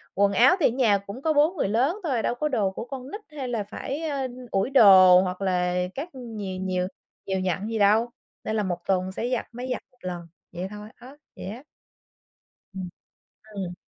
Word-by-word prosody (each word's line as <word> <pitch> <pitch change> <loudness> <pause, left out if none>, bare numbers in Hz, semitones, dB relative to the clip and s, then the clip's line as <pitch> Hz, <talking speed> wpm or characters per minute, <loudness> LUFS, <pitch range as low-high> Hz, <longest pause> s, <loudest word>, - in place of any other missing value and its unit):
quần 200 +1 +3
áo 255 - +6
thì - - +5
ở - - +2
nhà 230 -4 +3
cũng 200 +6 -9
có 315 0 +1
4 305 +5 +3
người 195 - +1
lớn 265 - +1
thôi, 260 -8 0
đâu 240 - -1
có 300 +5 -1
đồ 210 -7 +1
của 210 - -6
con 265 +1 -8
nít 420 - -6 0.2
hay 265 - -3
là 235 -4 -2
phải, 265 +8 -5
a, 280 -4 -2 0.2
ủi 195 +5 +1
đồ, 190 -8 +8
hoặc 185 +1 -3
là 180 -2 +1 0.2
các 305 +6 -5
nh 230 -3 -8 0.3
nhiều 185 -1 0 0.4
nhiều 190 -1 -1
nhặn 185 +2 -2
gì 225 - -2
đâu, 215 +4 +4 0.3
nên 220 - -2
là 210 - +1
một 180 -3 -2
tuần 185 -1 +1
sẽ 235 +5 -3
giặt 250 - -1
máy 245 +2 -6
giặt - - -2
một 255 - -31
lần. 175 -2 -6 0.2
Vậy 180 +2 -4
thôi 210 +1 -9
á, 255 +4 -14 0.2
vậy - - -8
á. 225 +7 -7 1.1
Ừm. 185 -2 -5 0.7
Ừm. 180 -3 -4
215 Hz, 210 wpm, -25 LUFS, 190-255 Hz, 1.1 s, đồ